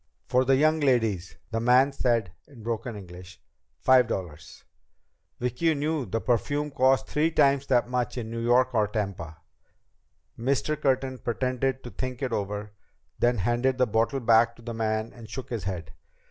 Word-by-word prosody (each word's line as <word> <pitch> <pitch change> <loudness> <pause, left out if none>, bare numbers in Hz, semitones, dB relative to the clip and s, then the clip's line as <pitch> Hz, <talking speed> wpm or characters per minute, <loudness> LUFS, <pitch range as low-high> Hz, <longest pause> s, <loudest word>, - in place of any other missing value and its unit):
"For 125 +1 +2
the 135 +1 +4
young 155 +3 +3
ladies," 115 - +1 0.2
the 115 - -1
man 125 +4 +4
said 115 -8 0 0.2
in 125 -6 -14
broken 115 0 -3
English. 90 -1 -11 0.4
"Five 130 -2 +5
dollars." 85 -8 -6 0.8
Vicki 125 +7 0
knew 145 -2 -1
the 115 +5 -1
perfume 145 +6 0
cost 130 0 +3
three 155 +2 +1
times 140 -3 +3
that 120 -2 +2 0.3
in 115 -2 -4
New 115 - -4
York 125 +2 +3
or 110 -3 +2
Tampa. 100 -7 -4 1.0
Mr. 140 +5 0
Curtin 135 -3 0
pretended 130 +2 -1
to 120 - -8
think 130 +5 -5
it 125 -3 -1
over. 105 0 -3 0.5
Then 120 0 +3
he 100 - -3
handed 120 +3 +1
the 130 - +4
bottle 115 +4 0
back 115 0 +4
to 115 - -17
the 120 0 -5
man 110 0 -2
and 115 -3 -12
shook 125 +3 -7
his 110 -6 -3
head. 90 -4 -5
120 Hz, 165 wpm, -27 LUFS, 110-130 Hz, 1.0 s, Five